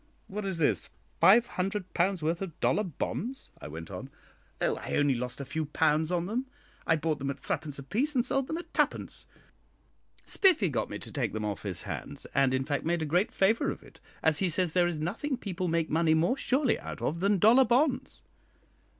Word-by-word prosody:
"What 210 +1 -5
is 190 -3 -2
this? 130 - +1 0.3
five 225 +5 +7
hundred 190 -2 -3
pounds' 180 -1 +1
worth 165 +3 0
of 180 -5 -6
dollar 210 - +2
bonds?" 230 - -4
I - - -6
went 80 +2 -8
on. - - -7 0.5
"Oh, - - +1
I - - -4
only 145 -1 +3
lost 125 +1 -3
a 140 - -4
few 155 +4 -2
pounds 155 +2 +2
on 175 -1 0
them. 240 +7 -2 0.4
I 160 - +5
bought 155 -1 -1
them 140 0 -2
at 140 0 -4
threepence 145 -2 -3
apiece 235 - -1
and 245 -1 +3
sold 270 -1 0
them 320 - -2
at 345 - -9
twopence. - - -1 1.0
Spiffy 340 - +4
got 130 - -1
me - - -4
to - - -9
take - - -2
them 110 0 -2
off 105 -1 -3
his 95 -4 -5
hands, - - -6
and, 135 -1 +3
in 130 0 0
fact, 145 -1 -1
made 170 0 0
a - - -1
great 175 +7 +1
favour 210 +4 +2
of - - -6
it, - - -17 0.2
as 160 -2 +3
he 190 - +1
says 170 0 0
there 175 -1 +4
is 170 -3 -2
nothing 230 - -2
people 185 -5 -3
make 165 -1 0
money 160 0 +3
more 170 +10 +2
surely 265 -1 +1
out - - -7
of 165 - -1
than 200 +2 +3
dollar 225 +8 +6
bonds." 260 +3 +1
175 Hz, 210 wpm, -29 LUFS, 150-210 Hz, 1.0 s, five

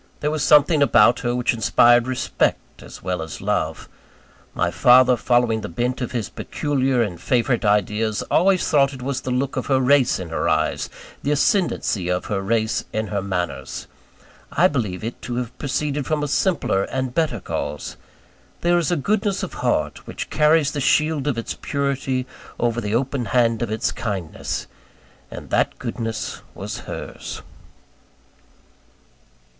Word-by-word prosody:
There 150 - 0
was 155 -1 -2
something 150 +1 +5
about 120 -3 +5
her 120 0 -1
which 125 0 +1
inspired 120 +2 +4
respect 130 -1 -1
as - - -12
well 90 -1 -2
as 80 -1 -6
love. - - -2 0.7
My - - +1
father, 125 +1 +6
following 120 -2 +2
the - - -5
bent 120 +10 -2
of 125 - -3
his 115 -6 -2
peculiar 135 -4 0
and 90 -6 -5
favourite 120 +1 +1
ideas, 105 +1 +1
always 185 +2 +3
thought 140 -2 +3
it 130 -2 -8
was 135 0 -2
the - - -5
look 130 +2 -1
of - - -2
her 135 -2 +3
race 130 0 +4
in 90 -2 -6
her 80 - -1
eyes, - - 0 0.3
the - - -2
ascendancy 145 - +1
of 90 0 -1
her 100 -2 -2
race 110 +2 0
in 110 -1 -2
her 100 -1 -1
manners. 95 -3 -4 0.7
I 180 - +4
believe 110 - -3
it 115 +2 -5
to 120 - -4
have 125 0 -4
proceeded 145 0 -2
from 155 -2 0
a - - -1
simpler 140 - +1
and 130 -1 -2
a - - -14
better 150 -5 0
cause. - - -4 0.7
There 175 0 +3
is 170 - 0
a 175 - +2
goodness 200 +5 0
of - - -5
heart, - - -1
which - - -6
carries 150 -1 +3
the 145 - -3
shield 150 +1 +2
of 135 -5 0
its 115 - -3
purity 135 -2 -2 0.3
over 120 0 0
the 105 0 -1
open 130 0 -1
hand 115 0 +2
of 120 - -1
its 110 0 -1
kindness: 100 -8 -4 0.6
and - - -9
that - - +1
goodness 115 -2 -4
was - - -5
hers. - - -7
125 Hz, 165 wpm, -22 LUFS, 110-145 Hz, 0.7 s, father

